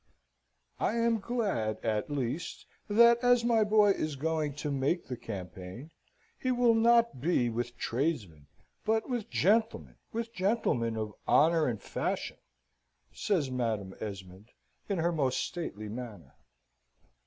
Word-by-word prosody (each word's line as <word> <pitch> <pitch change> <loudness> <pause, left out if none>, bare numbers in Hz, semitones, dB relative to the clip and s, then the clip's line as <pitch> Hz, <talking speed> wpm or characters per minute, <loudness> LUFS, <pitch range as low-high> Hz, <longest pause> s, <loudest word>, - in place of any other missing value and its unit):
"I - - +1
am 230 -1 +2
glad, 195 - -1
at 110 +1 -1
least, 145 +3 -3 0.2
that, 235 +3 +6
as 245 -1 +3
my 230 -2 +4
boy 210 -1 +5
is 155 -6 -2
going 155 0 -1
to 150 0 -3
make 140 +6 0
the 125 - -5
campaign, 100 - -8 0.5
he 255 - -1
will 245 -2 +4
not 230 - +3
be 130 -7 +2
with 120 +1 -4
tradesmen, 115 - -2 0.4
but 220 0 +1
with 240 -5 -3
gentlemen, 220 +4 +1
with 230 0 -4
gentlemen 185 - 0
of 110 -1 -3
honour 160 0 +4
and 115 -4 -2
fashion," - - -3 0.8
says 160 -10 0
Madam 110 -6 -2
Esmond, 95 0 -8 0.4
in 200 - 0
her 170 +1 +1
most 135 -6 0
stately 135 - -4
manner. 105 - -8
150 Hz, 130 wpm, -30 LUFS, -, 0.8 s, that